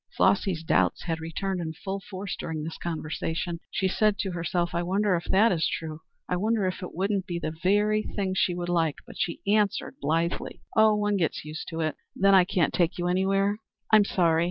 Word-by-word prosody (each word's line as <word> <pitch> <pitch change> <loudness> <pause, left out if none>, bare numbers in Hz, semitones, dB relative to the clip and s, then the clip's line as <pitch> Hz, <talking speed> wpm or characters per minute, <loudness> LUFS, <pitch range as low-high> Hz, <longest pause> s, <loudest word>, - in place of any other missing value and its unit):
Flossy's 190 -3 +2
doubts - - +2
had 165 -2 -2
returned 180 +3 -3
in 160 -1 -4
full 195 +4 -5
force 195 0 -6
during 160 -2 -4
the 160 +1 -5
conversation. 165 +1 -3
She 190 - 0
said 210 +2 +2
to 190 - -2
herself, 175 0 -1
"I 170 - 0
wonder 190 +2 +1
if 170 - -3
that 215 +4 +4
is 165 -3 +1
true? 155 -1 -4 0.3
I 180 - 0
wonder 215 +1 +1
if 185 +2 -2
it 180 - -7
wouldn't 195 +1 0
be 175 -3 -2
the 155 -2 -3
very 210 +3 +3
thing 195 -3 -3
she 185 -1 +1
would 175 0 -3
like?" 165 -4 +1
But - - -12
she 170 - -2
answered 205 0 +1
blithely, 165 +4 -1 0.2
"Oh, 220 -1 +6
one 210 -1 +1
gets 165 -4 -1
used 155 +1 -6
to 165 0 -4
it. 155 -1 -1 0.2
Then 195 +1 +4
I 185 -2 +7
can't 175 -2 +1
take 170 0 +1
you 175 0 -1
anywhere? 195 +3 +2 0.3
I'm 215 -1 +7
sorry. 170 -5 +2
180 Hz, 205 wpm, -27 LUFS, 165-200 Hz, 0.3 s, I